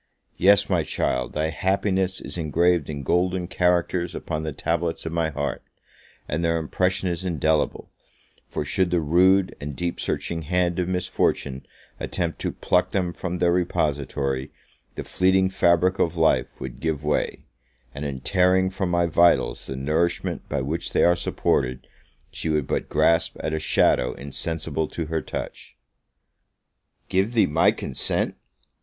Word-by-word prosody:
Yes, 100 +2 +5
my - - +2
child, 65 -1 -1
thy 80 +1 0
happiness 95 +2 0
is - - -7
engraved 85 0 +1
in 70 -2 -5
golden 90 +4 +1
characters 90 -1 +1
upon 75 -2 -3
the 80 0 -3
tablets 85 +3 -2
of 80 - -3
my 85 -1 0
heart; 70 -1 -3 0.7
and 80 +3 -2
their 85 0 +2
impression 90 +4 0
is 90 0 -2
indelible: 80 -3 0 0.6
for, - - -3
should 95 +4 +1
the 90 0 +2
rude 90 +5 +3
and 70 -1 -5
deep 85 +2 -3
searching 85 -1 -2
hand 90 +2 0
of 90 - 0
Misfortune 90 -7 -1 0.3
attempt 85 -3 -3
to - - -2
pluck 90 0 +1
them 90 -3 -1
from 90 0 -4
their 85 0 +3
repository, 70 -6 -1 0.5
the - - -4
fleeting 95 0 +2
fabric 90 0 +3
of 85 +1 +1
life 80 -1 +2
would 60 -2 -7
give 80 -3 -2
way; 75 0 -1 0.5
and 70 +2 -6
in 70 -3 -4
tearing 95 +2 +3
from 95 -1 -2
my 85 0 +2
vitals 85 +1 +3
the 65 - -4
nourishment 75 +6 -1
by - - -1
which 80 +6 -3
they - - +3
are 85 - +5
supported, 65 -6 -1 0.5
she 80 - -4
would 75 -3 +1
but - - -2
grasp 85 0 +2
at 80 - -2
a 80 - 0
shadow 65 -4 +2
insensible 80 +2 -3
to 85 - -4
her 80 0 -2
touch. - - -7 1.3
Give 100 +6 0
thee 110 - +5
my 75 +3 +3
consent? - - -1
85 Hz, 155 wpm, -24 LUFS, 75-90 Hz, 1.3 s, Yes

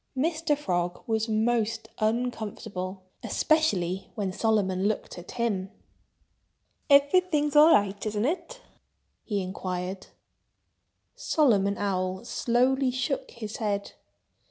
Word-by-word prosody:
Mr. 315 +1 +1
Frog 175 -9 -2
was 220 0 -1
most 225 0 0
uncomfortable—especially 205 - -1
when 200 -3 -2
Solomon 200 -3 +1
looked 210 -3 -3
at 175 - -10
him. 205 -6 -1 1.2
"Everything's 295 +1 +4
all 305 +2 +8
right, 200 -3 +2
isn't 210 +1 -1
it?" 375 - -3 0.6
he 205 -3 -2
inquired. 185 0 -4 1.1
Solomon 230 - +2
Owl 185 0 -2
slowly 255 +3 +1
shook 260 - -2
his 215 - -7
head. 205 -2 -2
220 Hz, 95 wpm, -27 LUFS, 195-265 Hz, 1.2 s, all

